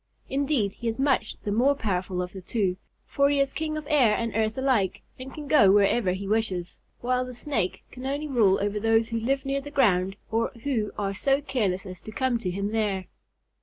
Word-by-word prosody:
Indeed, 270 -7 +1
he 235 - -6
is 225 - -1
much 270 -5 +1
the 205 - -2
more 255 +7 +3
powerful 185 -6 -2
of 180 - -8
the 190 - -8
two, 185 -1 -1 0.3
for 280 0 +2
he 285 -1 +2
is 275 -1 +1
king 310 -1 -2
of 305 - -6
air 265 -9 +4
and 230 -2 -3
earth 220 +1 0
alike 255 -8 +1 0.2
and 260 +1 -7
can 295 0 -8
go 205 -10 +6
wherever 200 -1 +3
he 195 +1 -5
wishes, 195 -5 -1 0.2
while 250 +1 +1
the 250 -1 -7
snake 235 -9 -2
can 260 +1 -7
only 285 +3 -2
rule 220 -9 +3
over 205 +1 -1
those 225 +1 +2
who 230 -1 -1
live 270 +4 -1
near 275 0 -1
the 290 - -8
ground 195 -9 +2 0.2
or 230 +1 +1
who 230 -7 -1
are 200 -1 -1
so 270 +7 +2
careless 205 -10 -1
as 185 -2 -8
to 215 - -9
come 255 0 0
to 190 - -3
him 200 +3 -2
there. 205 -4 0
225 Hz, 215 wpm, -26 LUFS, 200-270 Hz, 0.3 s, go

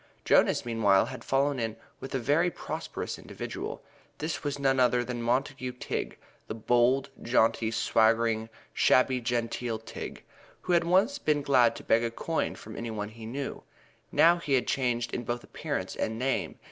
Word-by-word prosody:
Jonas, - - +4
meanwhile, 105 -5 +3
had 120 -2 -8
fallen 135 0 +1
in 110 -1 -2 0.2
with 135 - -6
a - - +3
very 145 +8 +2
prosperous - - -5
individual. - - -6 0.3
This 155 +1 -3
was 145 -1 -2
none 135 -1 +2
other 125 -1 +3
than 120 0 -4
Montague 130 +2 -1
Tigg, 125 - -4 0.3
the 110 - -4
bold, 120 +4 +2
jaunty, 115 -1 +2
swaggering, 115 0 +2 0.2
shabby 130 0 +3
genteel 120 -1 -2
Tigg, 110 - -8 0.4
who 180 - -1
had 170 -1 +3
once 195 +11 +3
been 150 -2 +1
glad 125 -4 +4
to - - -9
beg 115 +1 +3
a 115 - 0
coin 160 +7 -2
from 110 - -10
any 115 - -4
one 105 -2 -4
he 110 0 -10
knew. 135 +4 -5 0.5
Now 170 +1 +5
he 150 -4 -2
had 130 - +3
changed 120 -3 -1
in 120 - -2
both 120 +1 -3
appearance - - -4
and 110 - -2
name. 115 -10 -1
120 Hz, 170 wpm, -28 LUFS, 115-135 Hz, 0.5 s, Now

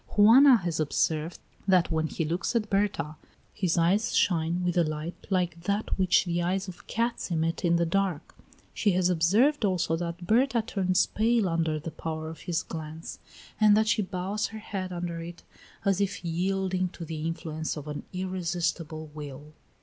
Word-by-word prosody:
Juana 245 +6 +8
has 175 -5 -3
observed 155 +2 0 0.3
that 185 -3 +4
when 160 0 +1
he 165 - -2
looks 175 +9 -2
at 215 -2 0
Berta 195 -7 0 0.4
his 185 -4 0
eyes 195 +7 +2
shine 170 0 +1
with 175 -1 0
a 175 - +4
light 155 +2 -5
like 175 -3 0
that 200 +2 0
which 185 0 +4
the 175 0 -1
eyes 190 +3 -1
of 175 -2 -10
cats 230 -1 -1
emit 165 -1 -1
in 170 -1 +3
the 170 0 +2
dark; 180 -2 -1 0.4
she 205 -3 +2
has 180 0 +2
observed 215 - +3
also 180 -4 +1
that 170 +1 -5
Berta 235 +3 +3
turns 185 -5 +1
pale 225 -1 +1
under 165 -2 0
the 165 +2 -6
power 160 0 -5
of 165 - -11
his 165 -1 0
glance, 160 0 -7 0.4
and 210 -1 +6
that 220 0 +2
she 215 - +2
bows 195 +2 -2
her 220 - -9
head 195 -3 -5
under 175 -1 -4
it 170 +1 -9 0.4
as 195 0 +2
if 200 -2 -2
yielding 185 +2 0
to 170 -1 -8
the 155 -1 -5
influence 160 -1 -4
of 150 0 -7
an 150 -1 -4
irresistible 170 -4 -3
will. 150 0 -9
175 Hz, 175 wpm, -28 LUFS, 165-195 Hz, 0.4 s, Juana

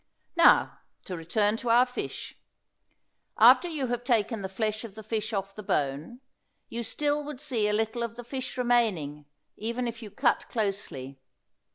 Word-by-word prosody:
Now 335 0 +5 0.3
to 185 - -4
return 205 +6 +1
to 240 0 -4
our 240 +2 +6
fish. 250 0 -6 1.0
After 355 - +7
you 305 -6 -2
have 245 -1 -2
taken 225 -3 +1
the 190 - -4
flesh 215 +2 -2
of 215 -4 -9
the 220 - -9
fish 215 0 -2
off 195 -2 -3
the 215 - -8
bone, 155 - -2 0.5
you 235 - -4
still 295 +6 0
would 290 -3 -7
see 250 -8 0
a - - +1
little 220 +2 0
of 230 -1 -3
the 245 - -8
fish 260 +1 -5
remaining, 200 - +1 0.3
even 235 +3 -2
if 230 0 -5
you 215 - -8
cut 240 +4 +1
closely. 195 - -3
225 Hz, 170 wpm, -28 LUFS, 200-245 Hz, 1.0 s, After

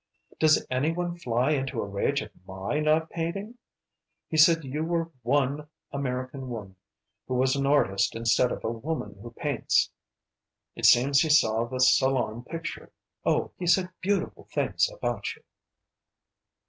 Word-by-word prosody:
Does 155 -1 +4
any 135 +5 +1
one 175 0 -3
fly 125 -4 0
into 135 -4 -1
a - - -1
rage 100 0 -1
at - - -12 0.2
my 95 +10 -3
not 155 +1 +1
painting? 195 +8 -4 0.7
He - - -3
said 165 +1 +6
you 145 +4 -3
were 165 0 -1
one 140 +4 0 0.2
American 130 -1 -4
woman 105 -5 -7 0.5
who 130 - -2
was 130 +1 +2
an 140 0 0
artist 100 -10 +2
instead 115 +2 +2
of - - -5
'a 110 - -1
woman 115 -4 -5
who 120 - -8
paints.' 140 0 0 0.8
It - - -2
seems 135 +3 +5
he 160 - +1
saw 115 -6 +4
the 130 +2 -5
Salon 125 -3 +3
picture. 165 +5 -7 0.4
Oh, - - +1
he 180 - -3
said 180 +1 +3
beautiful 200 +1 -1
things - - +1
about - - -3
you." - - -23
140 Hz, 150 wpm, -27 LUFS, 120-160 Hz, 0.8 s, said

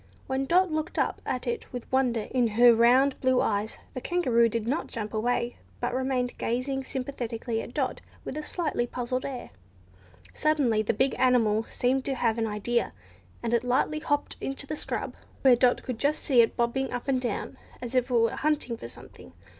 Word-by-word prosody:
When 265 0 -1
Dot 365 +2 +3
looked 310 0 -2
up - - 0
at 250 -1 -2
it 240 - -3
with 245 -2 -6
wonder 255 -4 +2
in 250 -2 +3
her 240 0 +8
round 250 +4 +4
blue 260 -1 +3
eyes, 210 +1 -1 0.2
the 255 - -5
Kangaroo 245 -10 +2
did 225 0 -3
not 285 +7 -1
jump 215 -1 -5
away, 235 +2 0 0.2
but 245 - -2
remained 255 -1 -1
gazing 265 +3 -1
sympathetically 240 -4 -4
at 240 - -10
Dot 275 -4 -1 0.2
with - - -5
a 305 - -3
slightly 300 -6 -2
puzzled 255 +1 -3
air. 260 -3 -6 0.8
Suddenly 280 -8 +2
the 215 - 0
big 265 +5 +2
animal 225 -4 +3
seemed 260 +2 0
to 270 - -1
have 230 -2 +1
an 225 - 0
idea, 220 +3 -1 0.5
and 235 0 -1
it 235 0 +2
lightly 255 +5 +1
hopped 290 -2 -1
off - - -29
into 275 +1 -3
the 305 - -4
scrub, - - -4 0.3
where 260 -2 +7
Dot 245 +1 +3
could 250 -3 -5
just 290 +2 0
see 255 -4 +5
it 225 - +1
bobbing 245 +3 0
up 245 - -4
and 260 -2 +1
down 245 - -3 0.2
as 245 -1 -6
if 255 0 +2
it - - -2
were 230 -1 +4
hunting 295 -6 -1
for - - -8
something. - - -14
250 Hz, 195 wpm, -27 LUFS, 235-270 Hz, 0.8 s, her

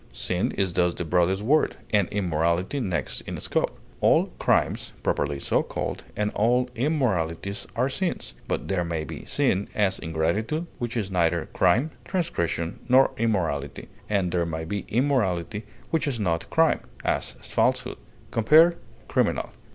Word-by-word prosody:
Sin 90 +1 -1
is 95 -3 0
thus 90 -1 +2
the 85 - -4
broadest 90 +4 +2
word, 150 +7 +3 0.2
and 100 -3 +3
immorality 90 - 0
next 90 - -2
in - - -4
scope; - - -1 0.2
all - - +4
crimes, - - +1
properly 70 -1 0
so - - +1
called, - - -4
and 105 0 0
all 125 +3 +2
immoralities, 100 - -1
are 125 +3 +2
sins; 140 - -2
but - - -2
there 95 -2 0
may 85 -2 -2
be 75 - -8
sin, 95 +2 +1
as 100 -2 +1
ingratitude, 85 - -1
which 120 0 -3
is 100 -4 -2
neither 85 -3 +2
crime, 115 - +3
transgression, 85 - -2
nor 130 +2 +6
immorality; 80 -11 -1 0.2
and 95 -4 +1
there 85 -1 +1
may 80 -1 -3
be 100 +4 -3
immorality 105 - 0 0.3
which 165 -2 +1
is 130 -5 -1
not 85 -5 -1
crime, - - +3 0.3
as - - 0
falsehood. - - 0 0.3
Compare 160 +9 +6 0.3
CRIMINAL. - - 0
100 Hz, 145 wpm, -26 LUFS, 85-120 Hz, 0.3 s, nor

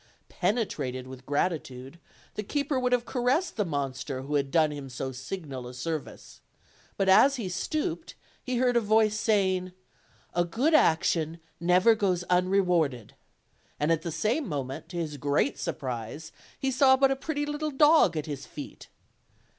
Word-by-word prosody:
Penetrated 140 - -2
with 130 0 -11
gratitude, 145 -2 -2 0.3
the - - -3
keeper 280 +5 -1
would 250 0 0
have 245 -1 +2
caressed 260 +8 0
the 210 - +1
monster 140 -4 -3
who 145 +2 -5
had 140 -2 +1
done 155 0 +3
him 140 -2 -7
so 130 +1 -4
signal 130 -1 -6
a 125 - -9
service; 155 +4 -6 0.6
but 195 - +1
as 265 +9 +6
he 230 -7 -4
stooped, 320 - -3 0.3
he 255 -1 -2
heard 245 0 +2
a 235 - +4
voice 215 0 +3
saying: 190 -5 +1 0.6
"A 175 - +2
good 240 - 0
action 165 - +2 0.2
never 180 +6 +5
goes 190 -5 0
unrewarded;" 180 - +1 0.7
and 150 +2 +1
at 165 - +2
the 170 - -4
same 220 - 0
moment, 135 -4 -5
to 175 - -6
his 155 -3 -3
great 145 +1 0
surprise, 130 +3 -5 0.3
he 270 - -1
saw 265 0 +5
but 270 0 +4
a - - +2
pretty 290 +1 -3
little 295 +1 -3
dog 295 - +5
at 150 - -2
his 145 -3 -6
feet. 145 - -9
180 Hz, 160 wpm, -28 LUFS, -, 0.7 s, as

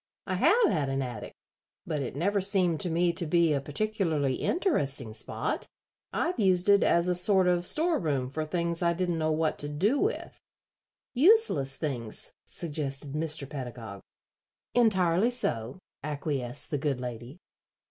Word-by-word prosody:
"I - - -3
have 485 - +4
had 150 -7 -1
an 135 0 -1
attic, 120 -4 -7 0.5
but 155 -3 -2
it 130 -2 -5
never 200 +7 0
seemed 185 -5 +1
to 180 - -1
me 170 +1 +1
to 170 - -2
be 170 -1 +3
a 140 - -1
particularly 155 -4 -1
interesting 140 - 0
spot. 110 - -3 0.4
I've 345 -5 -2
used 185 -2 +2
it 200 0 +6
as 170 +1 +2
a 180 - +2
sort 185 +1 +4
of 175 0 +3
store 325 +1 +2
room 140 -7 -1
for 155 +4 -4
things 170 +2 -2
I 170 -1 +2
didn't 175 -1 -2
know 155 0 0
what 155 0 -1
to 145 - -1
do 200 - +1
with." 430 +5 -3 0.7
"Useless 275 - +3
things," 120 -8 -2
suggested 145 -3 -3
Mr. 155 -2 -1
Pedagog. 120 -8 -8 0.7
"Entirely 195 -3 +3
so," 120 - -1 0.2
acquiesced 145 -3 -1
the 145 - -1
good 140 -3 -1
lady. 125 +3 -7
160 Hz, 155 wpm, -28 LUFS, 140-185 Hz, 0.7 s, it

